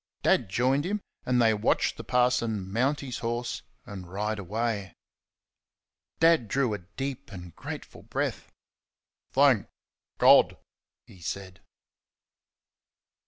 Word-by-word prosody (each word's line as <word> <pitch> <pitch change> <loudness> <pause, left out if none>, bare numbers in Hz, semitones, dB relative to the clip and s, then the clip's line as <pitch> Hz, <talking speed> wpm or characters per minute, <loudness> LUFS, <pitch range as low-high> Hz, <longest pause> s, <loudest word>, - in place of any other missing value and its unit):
Dad 115 - +3
joined 130 +8 +2
him, 205 +5 -1 0.3
and 125 -1 +3
they 115 -2 +5
watched 105 - +1
the - - -8
parson 115 -6 +1
mount 135 +6 +1
his 130 -3 -5
horse 120 +1 -3 0.2
and 90 -3 -9
ride 105 +2 -2
away. 105 0 -2 1.2
Dad 165 -7 +5
drew 130 +1 +1
a 105 - -3
deep 130 +8 -6
and 90 -3 -9
grateful - - -8
breath. - - -3 0.8
"Thank - - +4 0.5
God!" - - +6 0.5
he 90 - -16
said. 95 +1 -5
115 Hz, 115 wpm, -28 LUFS, 100-125 Hz, 1.2 s, God